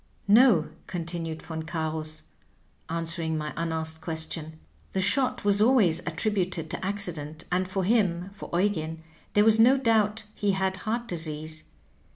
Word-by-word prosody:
No," 210 -6 +6 0.2
continued 165 -2 -4
Von 160 -1 -5
Oarus, 155 - -2 0.7
answering 165 -1 -1
my 150 -1 -4
unasked 160 -1 -2
question, 160 -1 -3 0.4
^'the 190 - +2
shot 255 +2 +1
was 205 0 +4
always 215 -9 +4
attributed 175 -2 -1
to - - -4
accident, 165 -6 -2
and 185 +1 +1
for 190 0 -1
him 190 -3 +1
(for 200 - -9
Eugen) 160 -5 -1 0.3
there 205 0 +5
was 220 0 +6
no 250 +4 +7
doubt 220 -4 +2
he 205 -1 0
had 190 0 0
heart 230 +5 -3
disease. 155 -3 -3
175 Hz, 140 wpm, -27 LUFS, 160-205 Hz, 0.7 s, no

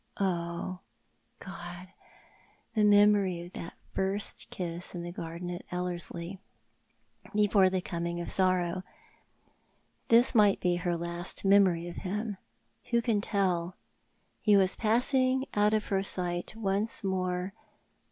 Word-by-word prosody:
Oh, 175 -1 -2 0.6
God! 180 -1 -9 0.8
the 215 -2 +2
memory 205 -3 +5
of 175 - -13
that 170 - -7 0.2
first 195 +2 0
kiss 175 0 -5
in 170 - -4
the 175 - -5
garden 170 +1 -6
at 175 - -5
Ellerslie, 180 0 -4 1.0
before 205 -2 +4
the 185 0 -1
coming 170 -1 -3
of 170 - -4
sorrow. 185 -1 +1 1.3
This 235 +2 +5
might 210 -4 +5
be 175 -1 +1
her 175 -1 -1
last 170 +3 -4
memory 190 -4 +4
of 175 - -8
him. 205 +2 -3 0.5
AVho 235 0 +3
can 220 -4 +1
tell? 185 -4 0 0.7
He 210 -2 +5
was 190 -1 +4
i)assing 255 +4 +2
out 210 +1 +3
of 215 - 0
her 195 -1 +2
sight 180 0 -2
once 210 +1 -1
more. 185 -1 -1
185 Hz, 125 wpm, -30 LUFS, 175-205 Hz, 1.3 s, memory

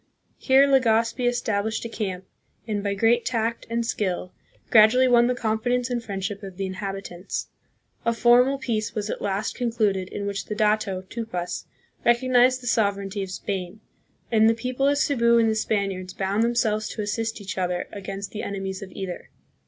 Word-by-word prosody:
Here 265 +1 +5
Legazpi 240 -2 +2
established 220 -2 -1
a - - -1
camp, 190 -5 -4 0.4
and, 205 -2 -2
by 200 -1 -1
great 230 +4 +3
tact 230 -1 -2
and 230 0 -1
skill, 185 -5 -2 0.4
gradually 230 +4 +6
won 240 -1 +5
the 250 - +1
confidence 245 +2 0
and 240 -1 -1
friend 195 -3 -5
ship 200 -1 -4
of 190 -3 -9
the 195 - -2
inhabitants. 195 -1 -5 0.5
A 230 - +2
formal 245 +3 +4
peace 225 -5 -2
was 210 -1 -2
at - - -5
last 200 +2 -1
concluded 215 -6 0
in 200 - -5
which 200 0 -3
the 210 - -4
dato, 210 -3 +1
Tupas, 185 -4 -5 0.4
recognized 250 +1 +4
the - - -9
sover 210 -4 +2
eignty 195 +1 -4
of 190 - -4
Spain; 190 +1 -4 0.5
and 220 -1 +5
the 225 - +2
people 255 +3 -1
of 285 0 +3
Cebu 235 -5 +3
and 230 -1 +4
the - - +1
Spaniards 195 -4 -2
bound 195 +2 0
themselves 230 -2 +1
to 215 - -4
assist 225 +2 -2
each 195 -1 -5
other 180 -1 -1
against 195 0 -6
the 215 - -5
enemies 195 -1 -4
of 190 -2 -8
either. 190 -2 -6
215 Hz, 175 wpm, -24 LUFS, 195-235 Hz, 0.5 s, gradually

